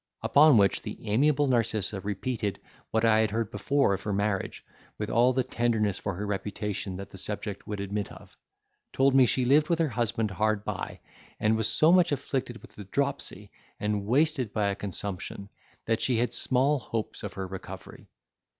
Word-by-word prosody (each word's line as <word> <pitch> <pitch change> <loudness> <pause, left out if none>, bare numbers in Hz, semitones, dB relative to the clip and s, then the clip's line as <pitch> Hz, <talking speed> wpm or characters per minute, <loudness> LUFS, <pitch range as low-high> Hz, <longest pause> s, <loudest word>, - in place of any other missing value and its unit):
Upon 145 -3 +6
which, 100 -2 +3
the - - -7
amiable 145 +7 +3
Narcissa 110 -6 0
repeated 105 +1 -3 0.3
what 110 +1 +1
I 110 -1 +5
had 110 -1 +2
heard 110 0 -2
before 135 +3 +1
of 95 - -3
her 105 - -3
marriage, 100 -1 -2 0.3
with 105 - -3
all 120 +3 +4
the 130 0 +1
tenderness 115 -5 0
for 100 -3 -3
her 105 +4 -4
reputation 100 -1 -3
that 100 +1 -8
the 95 - -10
subject 105 0 -5
would 105 -1 -4
admit 100 0 -3
of; - - -14 0.6
told 135 0 +3
me 130 -2 +6
she 130 +1 +1
lived 145 +4 +4
with 170 - +2
her 160 -2 +1
husband 115 -3 -1
hard 105 +2 0
by, - - -4 0.4
and 110 +1 +2
was 110 -1 +2
so 155 +7 +4
much 180 -2 +5
afflicted 130 -3 -3
with - - -14
the 105 - -10
dropsy, 140 +8 -3 0.3
and 105 -1 -1
wasted 135 -2 +2
by 105 -2 0
a 100 - -1
consumption, 100 0 -5 0.4
that 115 0 0
she 125 -3 +1
had 120 +2 0
small 135 +3 +2
hopes 115 -3 -4
of 105 - -6
her 95 -1 -4
recovery. 95 0 -9
110 Hz, 185 wpm, -28 LUFS, 100-130 Hz, 0.6 s, Upon